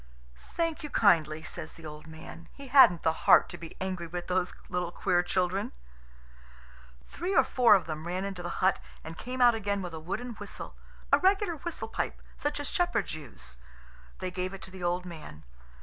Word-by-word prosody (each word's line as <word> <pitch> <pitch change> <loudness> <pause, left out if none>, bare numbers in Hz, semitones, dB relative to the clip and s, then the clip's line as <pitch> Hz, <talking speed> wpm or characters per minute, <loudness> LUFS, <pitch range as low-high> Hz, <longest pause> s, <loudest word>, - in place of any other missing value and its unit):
"Thank 330 -2 0
you 300 - -5
kindly," 160 - +3
says 160 -2 -7
the 165 - -13
old 150 0 -9
man. 160 +1 -11
He 280 -2 -10
hadn't 250 - +7
the 160 - +3 0.2
heart - - +8
to - - -7
be 165 -1 -9
angry 185 -2 -3
with 175 +1 -5
those 180 0 0
little 180 -1 -2
queer 175 -1 +2
children. 185 +2 -1 1.3
Three 370 +3 -3
or 270 - +7
four 245 -4 +6
of 185 -4 +1
them 155 0 -5
ran 185 +2 -2
into 195 -2 -5
the 175 - -4 0.2
hut 190 - +4 0.2
and 160 +1 -7
came 250 +7 -5
out 240 -1 +8
again 200 -3 -1
with 175 -2 -6
a 160 - -5
wooden 195 +10 -4
whistle, 205 - -8 0.4
a - - +8
regular 380 -2 +2
whistle 345 +3 -4
pipe, - - -3 0.2
such 290 0 -2
as 290 - -4
shepherds 350 - 0
use. 110 - -8 0.6
They 185 -1 -4
gave 185 +1 -3
it 190 - -11
to 185 - -9
the 190 -1 -10
old 175 +1 0
man. 155 - -9
185 Hz, 195 wpm, -29 LUFS, 165-240 Hz, 1.3 s, heart